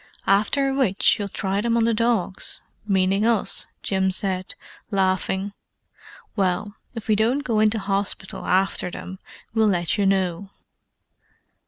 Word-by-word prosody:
"After 270 Hz, +8 st, +2 dB
which 230 Hz, -5 st, +2 dB
you'll 205 Hz, -, -2 dB
try 195 Hz, 0 st, -2 dB
them 235 Hz, +1 st, +1 dB
on 230 Hz, -, +3 dB
the 230 Hz, 0 st, +2 dB
dogs—meaning 195 Hz, -2 st, 0 dB
us," 225 Hz, -2 st, +3 dB, 0.2 s
Jim 190 Hz, -1 st, +1 dB
said, 185 Hz, -1 st, -3 dB, 0.3 s
laughing. 190 Hz, 0 st, 0 dB, 0.8 s
"Well, 195 Hz, 0 st, 0 dB, 0.2 s
if 225 Hz, -, -7 dB
we 215 Hz, -, +3 dB
don't 235 Hz, +7 st, +1 dB
go 225 Hz, -5 st, 0 dB
into 215 Hz, +1 st, +3 dB
hospital 195 Hz, -1 st, -2 dB
after 185 Hz, -1 st, +1 dB
them, 185 Hz, +2 st, -8 dB, 0.3 s
we'll 220 Hz, -1 st, +3 dB
let 175 Hz, +1 st, 0 dB
you 200 Hz, -, +3 dB
know." 190 Hz, 0 st, 0 dB
200 Hz, 130 wpm, -23 LUFS, 190-220 Hz, 0.8 s, on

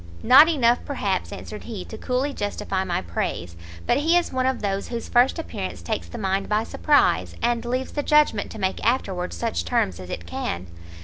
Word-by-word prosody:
"Not 275 Hz, +7 st, +8 dB
enough, 245 Hz, -7 st, +3 dB
perhaps," 200 Hz, -9 st, -2 dB
answered 210 Hz, -, -8 dB
he, 215 Hz, -6 st, -6 dB
"to -, -, -9 dB
coolly 255 Hz, +5 st, -1 dB
justify 195 Hz, -3 st, -2 dB
my 175 Hz, -2 st, -2 dB
praise; 85 Hz, 0 st, -3 dB, 0.3 s
but -, -, +3 dB
he 325 Hz, +4 st, +3 dB
is 350 Hz, -, -1 dB
one 260 Hz, 0 st, +1 dB
of 260 Hz, -4 st, -1 dB
those 195 Hz, -1 st, -1 dB
whose 235 Hz, -1 st, -5 dB
first 245 Hz, +6 st, +3 dB
appearance 90 Hz, -, -5 dB
takes 85 Hz, 0 st, -3 dB
the 85 Hz, -, -8 dB
mind 195 Hz, 0 st, -1 dB
by 215 Hz, +1 st, +2 dB
surprise, 290 Hz, +5 st, +2 dB
and 235 Hz, 0 st, 0 dB
leaves 255 Hz, +2 st, -2 dB
the 290 Hz, -, -2 dB
judgment 300 Hz, -8 st, +3 dB
to -, -, -9 dB
make 190 Hz, -1 st, -1 dB
afterwards 190 Hz, -, 0 dB
such 85 Hz, 0 st, -1 dB
terms 90 Hz, +1 st, 0 dB
as 90 Hz, -1 st, -9 dB
it 85 Hz, -, -5 dB
can. 85 Hz, +1 st, -4 dB
215 Hz, 195 wpm, -24 LUFS, 180-260 Hz, 0.3 s, Not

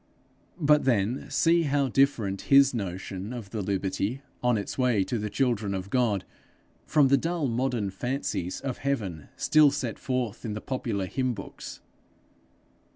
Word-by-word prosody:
But 150 Hz, -2 st, +4 dB
then 120 Hz, 0 st, +1 dB
see 170 Hz, +1 st, +3 dB
how 145 Hz, -3 st, +1 dB
different 115 Hz, -7 st, +1 dB
his 140 Hz, -1 st, +7 dB
notion 95 Hz, -1 st, -4 dB
of 115 Hz, -6 st, -7 dB
the 110 Hz, -, -3 dB
liberty 100 Hz, +6 st, -2 dB, 0.2 s
on 125 Hz, -2 st, +2 dB
its 100 Hz, -, -4 dB
way 125 Hz, -6 st, +2 dB
to 120 Hz, +3 st, -2 dB
the 105 Hz, 0 st, -3 dB
children 105 Hz, -4 st, 0 dB
of 95 Hz, +1 st, -5 dB
God, 115 Hz, -7 st, +1 dB, 0.6 s
from 150 Hz, -3 st, +4 dB
the 140 Hz, -, +5 dB
dull 165 Hz, +2 st, -1 dB
modern 120 Hz, -4 st, -1 dB
fancies 120 Hz, -4 st, -3 dB
of 130 Hz, -3 st, -4 dB
heaven 105 Hz, -, -3 dB
still 155 Hz, -1 st, +5 dB
set 135 Hz, -5 st, -3 dB
forth 125 Hz, -4 st, -2 dB
in 110 Hz, -3 st, -3 dB
the 105 Hz, -, -4 dB
popular 110 Hz, -6 st, -3 dB
hymn 130 Hz, +4 st, -1 dB
books! -, -, -9 dB
120 Hz, 155 wpm, -27 LUFS, 100-135 Hz, 0.6 s, his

